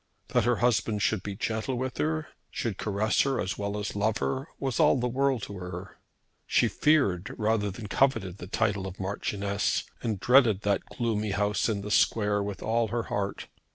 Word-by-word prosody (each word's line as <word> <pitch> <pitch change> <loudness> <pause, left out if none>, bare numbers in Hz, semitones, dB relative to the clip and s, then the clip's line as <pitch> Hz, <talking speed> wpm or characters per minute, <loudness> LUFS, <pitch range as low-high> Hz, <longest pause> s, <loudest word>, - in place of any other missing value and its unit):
That - - +2
her 120 0 +3
husband 110 -3 +1
should 110 -4 +1
be 100 +1 -5
gentle 110 +6 -2
with 130 +1 -3
her, 155 0 -1 0.2
should 110 -5 -3
caress 105 +1 +1
her 135 -2 +1
as 95 - -2
well 100 0 -2
as 105 0 -4
love 105 +1 +1
her, 135 +3 -2
was 135 0 -2
all 150 -3 +5
the 125 - 0
world 130 -2 +1
to 100 -2 -6
her. 90 +1 -8 0.5
She - - +3
feared 105 - +2
rather 110 -2 +1
than 100 +3 -7
coveted 105 -5 +1
the 90 - -7
title 100 0 0
of 95 0 -9
Marchioness, 100 +1 -1 0.2
and 110 -4 -2
dreaded 120 -3 +5
that 100 -1 +1
gloomy 110 -3 -1
house 105 0 +1
in 105 -2 -1
the 105 +1 -5
Square 105 -1 +3
with 100 -1 -5
all 115 +1 +1
her 115 +2 -2
heart. 100 -1 -2
105 Hz, 190 wpm, -28 LUFS, 100-120 Hz, 0.5 s, all